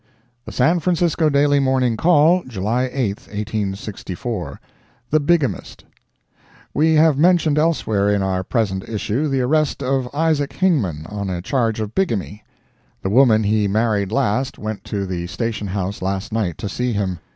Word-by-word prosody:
The - - -7
San 165 +8 +2
Francisco 170 -2 +1
Daily 145 0 +3
Morning 130 -3 +1
Call, 165 +5 +4
July 120 +3 -1
8,1864 105 - -4 0.5
THE 155 - +4
BIGAMIST 145 - -1 0.9
We 160 +2 +3
have 155 -2 +4
mentioned 165 -3 +3
elsewhere 110 -11 +1
in 100 -1 +1
our 95 -1 -1
present 95 -3 -2
issue 115 +6 -1
the 135 -2 0
arrest 150 +2 +1
of 130 -1 0
Isaac 145 -2 0
Hingman, 110 - 0
on 100 +1 -5
a 90 -2 -3
charge 115 -2 0
of 110 0 -4
bigamy. 110 - -2 0.6
The 95 - -1
woman 115 -2 +5
he 105 0 +2
married 105 -1 0
last, 130 +1 0
went 110 -1 -5
to 100 -2 -3
the 90 -2 -4
station 105 +1 -3
house 95 +1 -3
last 95 +1 -3
night 100 -8 -1
to - - -4
see 125 +5 -2
him. 95 -4 -2
115 Hz, 150 wpm, -20 LUFS, 100-145 Hz, 0.9 s, woman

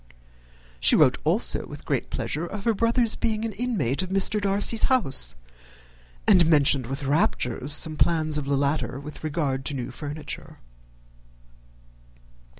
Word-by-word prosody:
She - - +5
wrote - - +3
also - - 0
with - - -11
great - - -2
pleasure 160 +4 -4
of 200 +2 -7
her 230 - +1
brother's 230 +1 +1
being 220 -1 -2
an 225 - -3
inmate 195 - -1
of 185 - -5
Mr. 195 +2 +2
Darcy's 200 +3 +2
house, 225 - +2 0.9
and 180 - +6
mentioned 140 -5 +3
with 135 +3 -5
raptures 140 - -1
some 155 +1 +2
plans 155 -2 +1
of 145 - -6
the 140 0 0
latter 140 -1 -2
with 150 +2 -11
regard 145 -4 -2
to 145 - -2
new 125 -2 -5
furniture. 155 +2 -8
155 Hz, 145 wpm, -24 LUFS, 140-200 Hz, 0.9 s, and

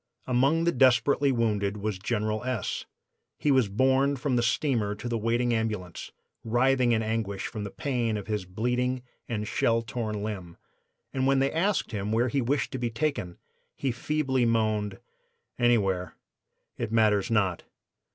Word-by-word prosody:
Among 135 +6 +2
the 170 - +3
desperately 135 +1 +4
wounded 105 -4 0
was 105 -2 -3
General 110 +1 -1
S. 125 -5 -2 0.5
He 150 - +1
was 130 -6 +3
borne 130 +6 +3
from 130 0 -1
the 120 - +3
steamer 115 -4 +1
to 115 - -6
the 120 - -1
waiting 120 +2 +1
ambulance, 105 -6 -3 0.3
writhing 125 +2 +3
in 110 -1 +2
anguish 110 -3 -2
from 105 -2 -5
the - - -4
pain 120 -2 -1
of 100 - -6
his 105 -3 -2
bleeding 125 +6 -1 0.3
and 105 -2 -2
shell 115 +2 +1
torn 110 -3 -3
limb, 95 -6 -5 0.6
and 130 0 +1
when 135 0 +4
they 135 +1 +2
asked 190 0 0
him 105 -1 -3
where 120 +3 +2
he 135 +3 0
wished 135 +4 0
to 130 - -4
be 120 -1 -1
taken 115 - -2 0.4
he 135 - -1
feebly 130 +1 0
moaned: 110 -3 +1 0.6
"'Anywhere, 100 -7 +2 0.6
it - - -2
matters 105 -3 +3
not. 100 -6 +1
115 Hz, 160 wpm, -27 LUFS, 105-130 Hz, 0.6 s, desperately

